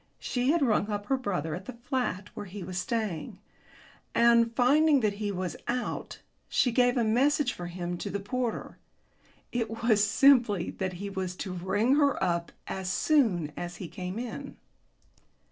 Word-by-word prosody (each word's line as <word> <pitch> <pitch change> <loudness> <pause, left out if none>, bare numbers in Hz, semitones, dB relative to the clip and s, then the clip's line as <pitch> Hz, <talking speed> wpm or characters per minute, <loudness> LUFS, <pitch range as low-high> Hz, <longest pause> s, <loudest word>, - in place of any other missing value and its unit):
She 250 +1 -1
had 325 0 +3
rung 220 -4 +2
up 205 -1 -3
her 270 - +2
brother 180 - -2
at 185 +3 -6
the 255 - -7
flat 245 -7 -2
where 205 - -7
he 190 +1 -7
was 180 0 -4
staying, 215 -6 -3 0.8
and, 235 -1 +5
finding 285 +3 +4
that 210 -2 +1
he 205 -1 -1
was 185 -2 -3
out, 245 +1 -3 0.3
she 250 - +2
gave 245 +1 +3
a 240 - +3
message 255 +4 +2
for 175 - -6
him 175 0 -4
to - - -4
the 200 - -2
porter. 235 +4 -3 0.7
It 230 -3 -1
was 220 -3 +4
simply 235 -7 +4
that 185 -1 -3
he 200 +3 -6
was 185 -2 -3
to 185 - -5
ring 205 +9 +1
her 285 -2 +3
up 170 -1 0
as 190 -1 -3
soon 180 - +2
as 175 0 -5
he 180 - -7
came 180 +3 -6
in. 235 - -6
210 Hz, 170 wpm, -29 LUFS, 185-250 Hz, 0.8 s, and